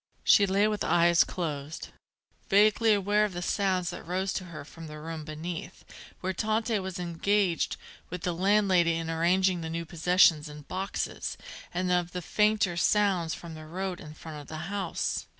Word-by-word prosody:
She 200 - +6
lay 200 +2 +3
with 210 -1 -1
eyes 170 0 +4
closed, 155 -3 -5 0.6
vaguely 215 +3 +5
aware 205 +1 +3
of 210 -3 -1
the 175 0 -4
sounds 185 -2 0
that - - -7
rose 190 +3 -2
to 185 - -3
her 155 -5 -9
from 165 +2 -11
the 150 0 -8
room 160 0 -6
beneath, 165 +3 -7 0.4
where 190 +1 -1
Tante 220 +2 0
was 190 -1 -5
engaged 180 +1 0 0.3
with 180 0 -6
the 175 - 0
landlady 185 -2 +3
in 165 0 -3
arranging 180 +2 +2
the 160 - -4
new 165 +1 -3
possessions 165 -2 +3
in 150 0 -10
boxes, 190 +6 -4 0.3
and 180 +1 -1
of 175 -1 +1
the 180 - -3
fainter 210 -3 +2
sounds 185 -3 +2
from 170 -1 -9
the 155 0 -10
road 185 +2 -4
in 150 0 -10
front 155 -2 -8
of 145 - -14
the 160 +5 -6
house. 195 -4 -2
180 Hz, 175 wpm, -28 LUFS, 165-195 Hz, 0.6 s, She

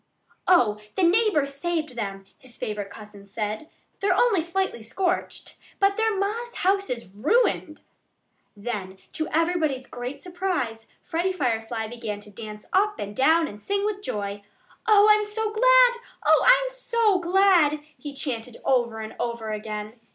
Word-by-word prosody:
"Oh! 230 -13 +4 0.2
The 380 - +1
neighbors 345 -6 +3
saved 310 -1 -2
them," 195 -4 -5
his 255 -2 -16
favorite 205 -2 -4
cousin 205 -1 -12
said. 215 +7 -4 0.3
"They're 390 -2 +2
only 445 -8 +4
slightly 345 -5 -2
scorched. 360 - -3 0.2
But 395 0 +3
their 445 -1 +1
ma's 455 +5 -2
house 395 +1 +1
is 235 -6 -5
ruined." 310 - +1 0.8
Then, 200 -3 -5
to 315 - -3
everybody's 315 -5 0
great 250 +3 -7
surprise, 350 -12 -3 0.2
Freddie 345 +3 -1
Firefly 230 -8 -2
began 220 -2 -5
to 210 - -13
dance 210 0 -9
up 415 +2 +2
and 205 +1 -6
down 320 +6 +4
and 210 -4 -10
sing 400 - -1
with 415 -1 -2
joy. 205 - -4 0.5
"Oh, 420 -1 +7
I'm 425 0 +4
so 425 +1 -3
glad! - - +5 0.3
Oh, - - +5
I'm - - +5
so 460 -5 +2
glad!" 345 -4 +4
he 290 +2 -7
chanted 245 -4 -3
over 240 -4 +1
and 220 0 -7
over 235 -2 -3
again. 215 0 -5
305 Hz, 150 wpm, -25 LUFS, -, 0.8 s, Oh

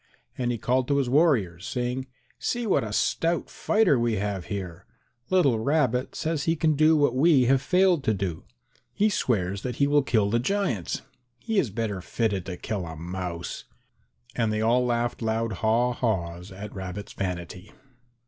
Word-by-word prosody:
And 120 -1 -1
he 120 - -2
called 125 +3 0
to 140 - +2
his 130 -3 0
warriors 120 - +2
saying, 125 +1 -2 0.3
"See 240 -1 -1
what 200 - +2
a 110 - -5
stout 165 +9 0
fighter 210 - +2
we 115 -1 +1
have 100 -2 -2
here! 95 -3 -6 0.4
Little 145 -12 +3
Rabbit 130 -1 +1
says 155 -2 -2
he 165 - +2
can 155 -1 +2
do 155 +2 +4
what 145 -4 +2
we 140 -2 +5
have 135 +1 +3
failed 180 -4 +3
to 110 - +3
do; 90 -4 -3 0.5
he 210 +1 +3
swears 100 - 0
that 125 -2 -4
he 140 - +2
will 145 +1 +4
kill 110 -6 +1
the 115 - +2
giants; 130 - -1 0.3
he 220 - 0
is 135 - 0
better 105 -2 -3
fitted 100 -2 -1
to 90 -2 -5
kill 95 -4 -4
a 80 - -7
mouse!" 85 +1 -5 0.7
And 115 -2 +1
they 110 - -1
all 120 +3 +3
laughed 120 -1 -1
loud 110 0 -1
haw 115 +3 +2
haws 90 -6 -2
at 100 +2 -8
Rabbit's 95 +1 -6
vanity. 90 0 -5
115 Hz, 175 wpm, -26 LUFS, 100-140 Hz, 0.7 s, we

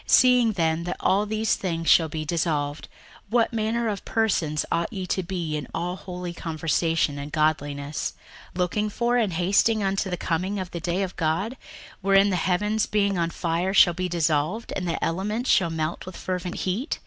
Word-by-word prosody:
61:003:011 - - -16
Seeing 250 -3 +6
then 165 -3 0
that 175 - -3
all 200 +3 +2
these 220 +1 +1
things 165 -3 -3
shall 160 -2 +5
be 155 0 -4
dissolved, 150 -2 -1 0.4
what 235 +1 +2
manner 225 +1 0
of 205 -2 -3
persons 170 -9 0
ought 170 0 0
ye 190 -4 -4
to 190 - -1
be 170 -4 -3
in 150 -3 -4
all 175 +2 -2
holy 180 -2 -6
conversation 165 -2 0
and 145 +1 -6
godliness, 145 -1 -1 0.4
61:003:012 - - -8
Looking 210 +4 0
for 240 +3 +1
and 215 -7 +1
hasting 200 +5 +2
unto 195 0 0
the 180 - -2
coming 180 +5 -1
of 185 -2 -4
the 170 - -4
day 175 +3 -1
of 185 -2 -5
God, 170 +9 0 0.5
wherein 195 +1 +4
the - - +1
heavens 210 +4 +1
being 200 -3 +1
on 170 -1 +1
fire 175 +3 -1
shall 175 -2 +7
be 180 +1 -2
dissolved, 165 +5 0
and 180 -2 -2
the 165 - -2
elements 210 +8 -1
shall 175 -3 +4
melt 160 +2 -3
with 185 - -8
fervent 180 -1 -3
heat? 205 - -2
180 Hz, 190 wpm, -25 LUFS, 165-200 Hz, 0.5 s, shall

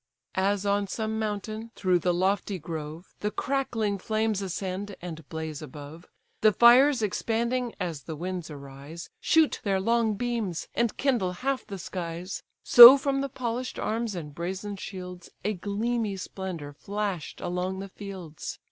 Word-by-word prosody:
As 200 +1 +1
on 200 0 +1
some 220 +2 -2
mountain, 215 +1 -3
through 185 -2 +2
the 180 +1 +1
lofty 190 +2 0
grove, 160 +1 -7
The 210 - -1
crackling 225 -4 -1
flames 215 0 0
ascend, 195 +1 -4
and 165 -4 -8
blaze 160 -2 -5
above; 150 +5 -10 0.3
The 215 - +6
fires 245 +4 +6
expanding, 235 +4 -1
as 170 -6 -3
the 160 - -6
winds 175 +1 -4
arise, 140 +3 -9
Shoot 320 -2 +3
their 195 -2 +1
long 230 +1 +2
beams, 225 -7 -2
and 235 -2 0
kindle 235 -10 +1
half 275 -1 0
the 200 -2 -6
skies: 175 0 -5 0.2
So 245 +3 +12
from 275 0 0
the 275 - -2
polish'd 250 -1 -4
arms, 225 -1 -2
and 150 -4 -6
brazen 190 +5 -4
shields, 180 -2 -8 0.2
A 215 - +1
gleamy 210 +2 -2
splendour 185 -6 -6
flash'd 200 0 -4
along 180 +2 -2
the 195 +1 -6
fields. 185 -6 -7
195 Hz, 150 wpm, -27 LUFS, 175-225 Hz, 0.3 s, So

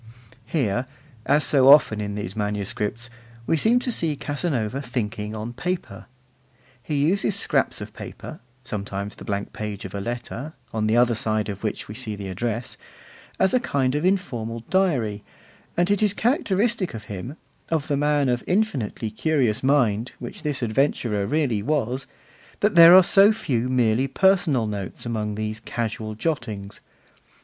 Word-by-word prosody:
Here, 125 -4 0 0.4
as 145 +2 +4
so 135 -3 +4
often 120 -7 +6
in 100 -1 -4
these 105 -2 -5
manuscripts, 105 +2 -2 0.3
we 165 - +2
seem 220 +9 +4
to 250 - 0
see 165 -8 +1
Casanova 140 -5 -2
thinking 110 -4 -4
on 110 +2 -5
paper. 180 +7 -4 0.7
He 150 +5 -4
uses 195 +3 +1
scraps 200 - 0
of - - -8
paper - - -9 0.2
(sometimes 100 -3 -4
the - - -11
blank 100 -2 -3
page 105 -2 -5
of 95 - -8
a 100 - -3
letter, 120 +6 -5 0.2
on 110 -1 0
the 110 +2 +3
other 120 0 +4
side 110 -1 -1
of 100 0 -6
which 105 - -3
we 105 - -7
see 110 -2 -4
the 100 -1 -6
address) 115 +5 -3 0.6
as 190 - +2
a 255 - +4
kind 135 - 0
of 150 +2 -1
informal 120 - -1
diary; 125 - +1 0.5
and 175 +3 +2
it 205 - +2
is 210 -2 +3
characteristic 220 - +1
of 110 - -7
him, 105 - -7 0.3
of 160 -3 0
the 145 - +1
man 145 0 +2
of 125 -1 0
infinitely 145 - -1
curious 125 -3 +1
mind, 125 -5 +2
which 120 - -8
this 145 -4 -2
adventurer 110 -4 0
really 140 -9 +1
was, 130 0 -1 0.5
that 210 +1 +3
there 170 +1 +10
are 185 - +9
so 195 +4 +6
few 130 - -1
merely 125 0 +2
personal 160 - +3
notes 100 -1 -5
among 105 -3 -2
these 110 0 -3
casual 110 -1 -4
jottings. 110 -7 -3
120 Hz, 160 wpm, -24 LUFS, 110-155 Hz, 0.7 s, there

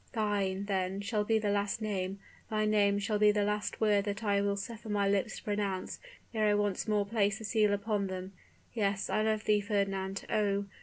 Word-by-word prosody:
Thine, 200 -3 0
then, 190 -1 -1
shall 210 +1 0
be 220 +1 +2
the 210 -2 0
last 205 +2 0
name, 195 -3 -2 0.3
thy 215 -1 +1
name 205 -1 +3
shall 205 +1 -1
be 210 0 +6
the 210 0 +1
last 210 0 -2
word 210 -2 +3
that 205 +1 -3
I 200 -1 +2
will 200 0 +1
suffer 220 +3 -7
my 205 -1 +1
lips 200 +2 0
to - - -10
pronounce 205 -3 -2 0.3
ere 215 -1 +2
I 210 - +4
once 205 -1 0
more 210 -1 +2
place 200 -1 +1
the 225 - -9
seal 210 -1 +2
upon 205 0 0
them. 185 0 -6 0.4
Yes, 200 -3 0
I 215 - +2
love 215 0 +1
thee, 210 -1 +3
Fernand; 195 -2 -1
oh! 200 -2 +1
205 Hz, 205 wpm, -31 LUFS, 200-215 Hz, 0.4 s, be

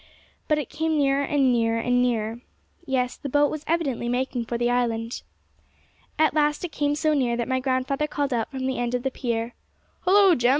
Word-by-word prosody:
But 305 - +2
it 295 -5 -2
came 320 0 -1
nearer, 280 -1 +2
and 275 -2 +2
nearer, 230 -1 +1
and 245 +1 +2
nearer. 230 -1 -1 0.5
Yes, 250 -2 0
the 280 - -6
boat 290 +2 +3
was 305 -1 -5
evidently 280 -8 0
making 245 -1 -1
for 235 +1 -3
the 240 +1 +1
island. 230 -1 -1 1.0
At 315 -1 +3
last 295 +2 +1
it 345 - -6
came 290 0 0
so 310 +1 +1
near 245 -5 +1
that 235 - -2
my 260 0 +1
grandfather 265 +3 0
called 285 -2 -2
out 230 -2 -1
from 265 -2 -4
the 265 0 -1
end 245 0 -1
of 245 - -2
the 265 - -1
pier, 235 -2 -3 0.5
'Hollo, 390 0 +5
Jem! 245 -4 +2
260 Hz, 205 wpm, -25 LUFS, 240-290 Hz, 1.0 s, Hollo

